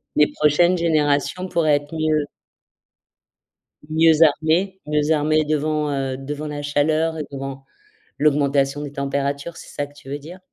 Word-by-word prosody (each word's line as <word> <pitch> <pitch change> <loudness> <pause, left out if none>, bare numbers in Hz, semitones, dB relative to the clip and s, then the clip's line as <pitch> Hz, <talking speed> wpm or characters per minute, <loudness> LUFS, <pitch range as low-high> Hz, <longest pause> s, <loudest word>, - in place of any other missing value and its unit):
Les 150 - +5
prochaines 170 +5 +3
générations 155 +2 +1
pourraient 165 -4 +2
être 145 +2 -10
mieux 155 -1 +1 1.6
mieux 160 0 +4
armées 165 +6 +2
mieux 150 0 0
armées 155 0 +2
devant, 150 0 0
heu, 135 -2 -2
devant 145 +3 -6
la 145 -1 -5
chaleur, 155 +3 0
et 150 - -4
devant 135 0 -6 0.5
l'augmentation 140 -1 +2
des 145 -1 -6
températures. 140 +3 -3
C'est - - -12
ça 145 - -2
que 145 - -20
tu 145 -2 -15
veux 145 +1 -4
dire? 165 +6 -11
150 Hz, 150 wpm, -21 LUFS, 145-155 Hz, 1.6 s, Les